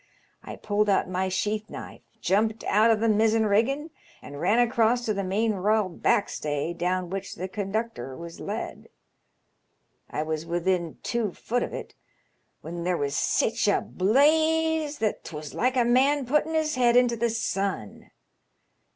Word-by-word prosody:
I - - -8
pulled 210 0 0
out 195 - +2
my 185 +1 -1
sheath 210 +3 -2
knife, - - -9 0.2
jumped 220 +3 +1
out 215 +2 +3
o' 225 - +5
th' 220 +1 +1
mizzen 220 +1 +3
riggin', 270 +10 +1 0.3
and 145 0 -8
ran 225 - +3
across 240 0 +2
to 215 - 0
the 200 -1 -2
main 210 +4 0
'royal 210 +1 +1
back 190 +3 +1
stay, 150 +2 -3
down 180 +1 -2
which 195 0 -5
the 185 +2 -4
conductor 195 - -4
was 170 0 -9
led. - - -6 1.2
I 150 - -2
was 155 0 -3
within 175 0 -1
two 225 -6 -1
foot 245 +2 -2
of - - -3
it, - - -7 0.7
when 170 +1 -6
there 180 0 0
was 140 0 -2
sich 220 +9 +1
a 205 - +3
blaze 315 +7 +2
that 215 -2 -1
'twas 150 -2 -8
like 255 +2 0
a 245 - +4
man 265 +3 +3
putting 300 +5 +1
his 310 -1 +1
head 245 -1 +4
into 245 -1 +4
the 235 +1 0
sun. 195 - -3
215 Hz, 160 wpm, -26 LUFS, 185-240 Hz, 1.2 s, o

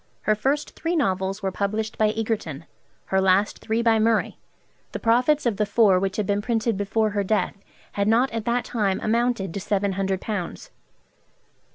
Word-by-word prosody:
Her 215 - +2
first 275 +8 -1
three 335 +1 -2
novels 195 - -1
were 190 - 0
published 215 +3 -2
by 215 -1 +2
Egerton, 210 -9 -3 0.5
her 190 - +4
last 190 +2 +2
three 225 +1 -1
by 225 -1 +4
Murray. 225 0 +1 0.5
The - - -3
profits 250 +6 +2
of 230 -5 +1
the 210 - +1
four 205 -3 +4
which 195 0 -2
had 210 - 0
been 205 0 0
printed 225 0 0
before 210 +2 0
her 205 -1 0
death 210 +2 0 0.4
had 200 0 -1
not 235 +5 +3
at 225 -1 -4
that 240 +1 0
time 200 -5 0
amounted 230 -5 0
to - - -3
seven 200 0 0
hundred 190 0 -1
pounds. 195 -6 -5
215 Hz, 180 wpm, -24 LUFS, 195-230 Hz, 0.5 s, her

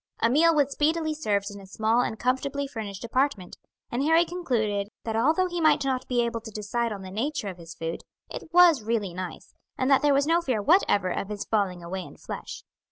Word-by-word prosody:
A 230 - +2
meal 325 +4 +5
was 285 -2 +2
speedily 315 +2 +1
served 205 -9 -1
in 200 0 -10
a 195 - -13
small 220 +4 +1
and 220 - -2
comfortably 275 +3 -1
furnished 220 -7 -6
apartment; 235 -5 -1 0.3
and 240 - -1
Harry 325 +4 +4
concluded 225 - -1 0.2
that 225 -1 -3
although 310 +11 +3
he 350 -1 -3
might 310 -3 +4
not 260 -1 -1
be 240 -2 +1
able 230 -1 -3
to 220 - -9
decide 220 +2 -2
on 200 -2 -6
the 185 - -8
nature 225 +1 -2
of 180 -2 -9
his 165 0 -10
food, 165 0 -4 0.3
it - - -8
was 345 -5 +6
really 215 -4 -1
nice, 180 -1 -7 0.2
and 260 +2 +1
that 270 - +5
there 295 - +3
was 280 +1 +3
no 335 +2 +3
fear 255 -9 -1
whatever 205 - +3
of 200 - -3
his 210 -1 -4
falling 190 -5 -1
away 185 +2 -4
in - - -11
flesh. - - -7
235 Hz, 220 wpm, -26 LUFS, 205-295 Hz, 0.3 s, was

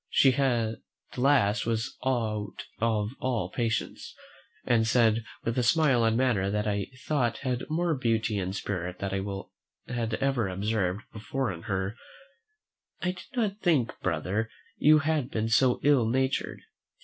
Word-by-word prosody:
She 135 -2 +5
at 120 -5 +1 0.4
last 125 -6 +3
was 115 0 -1
out 110 -5 -2
of 110 -2 +1
all 125 -3 -1
patience, 115 -5 -2 0.5
and 115 -2 +3
said, 115 -1 +3 0.2
with 115 +2 0
a - - +3
smile 130 -1 +3
and 115 0 +3
manner 120 -7 +2
that 105 +1 -1
I 100 -2 -1 0.2
thought 125 -7 +1
had 125 +1 -2
more 165 +1 +1
beauty 115 -5 0
and 95 +1 -3
spirit 90 -3 -3
than 100 0 -3
I 95 +4 -7
had 115 -2 -1
ever 135 -5 0
observed 95 0 -1
before 125 +3 -2
in 85 - -9
her, 95 +2 -1 1.1
"I 180 - +1
did 180 - -11
not 215 -4 0
think, 155 - +2
brother, 95 +6 -1 0.3
you 155 +1 +6
had 155 -3 0
been 110 -3 -1
so 125 +2 +4
ill 140 -6 +4
natured. 130 +2 0
115 Hz, 150 wpm, -28 LUFS, 105-130 Hz, 1.1 s, you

